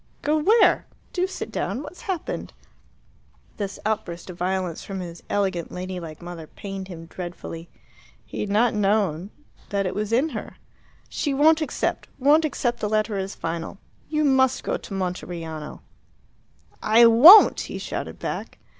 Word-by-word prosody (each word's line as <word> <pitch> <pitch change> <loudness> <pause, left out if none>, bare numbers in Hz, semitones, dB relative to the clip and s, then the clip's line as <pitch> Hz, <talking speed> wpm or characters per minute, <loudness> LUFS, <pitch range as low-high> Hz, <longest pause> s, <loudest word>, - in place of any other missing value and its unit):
"Go 300 +2 +2
where? 430 +9 +4 0.3
Do 365 0 +1
sit 380 - -6
down. 270 - -3
What's 310 +5 -10
happened?" 375 -4 -4 1.0
This 200 -2 -4
outburst 195 -5 -3
of 175 - -12
violence 185 -2 -2
from 195 -1 -6
his 170 -2 -7
elegant 190 -5 -1
ladylike 180 -3 -6
mother 170 -2 -8
pained 195 +1 -7
him 165 -3 -9
dreadfully. 170 -1 -8 0.6
He - - -8
had 210 - -2
not 220 +4 +3
known 200 -4 +1 0.4
that 200 -1 0
it 185 - -2
was 210 +1 -3
in 260 +7 +2
her. - - -7 0.5
"She 285 -3 -2
won't 315 +3 +5
accept 310 - -2
won't 295 +4 +4
accept 240 -5 -1
the 210 - -2
letter 215 0 0
as 195 +1 -4
final. 165 +2 -4 0.3
You 305 0 +1
must 265 -2 +3
go - - -1
to - - -8
Monteriano!" 170 -4 -5 1.0
"I 225 +2 +6
won't!" 285 - +9
he - - -5
shouted - - -5
back. - - -5
200 Hz, 150 wpm, -24 LUFS, 180-265 Hz, 1.0 s, won't